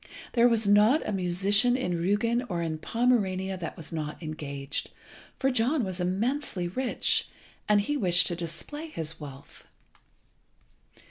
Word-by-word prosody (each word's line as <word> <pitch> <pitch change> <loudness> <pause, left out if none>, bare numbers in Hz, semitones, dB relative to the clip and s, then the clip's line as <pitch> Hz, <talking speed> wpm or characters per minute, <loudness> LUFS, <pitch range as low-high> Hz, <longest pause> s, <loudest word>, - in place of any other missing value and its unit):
There 240 0 +5
was 225 -3 +2
not 210 +9 +4
a - - -1
musician 200 +6 +3
in 180 -9 -2
Rügen 205 +8 +1
or 170 -2 -2
in 160 -1 -3
Pomerania 195 -4 0
that 170 -2 -6
was 160 0 -7
not 155 +1 -5
engaged, 145 -3 -4 0.5
for 270 -1 +1
John 250 +3 +1
was 185 -2 -4
immensely 195 +1 -1
rich, 250 +8 0 0.4
and 210 -1 +5
he 295 +9 -2
wished 180 - +4
to 175 - -1
display 170 - -6
his 165 - -6
wealth. 140 -2 -11
190 Hz, 140 wpm, -28 LUFS, 170-235 Hz, 0.5 s, There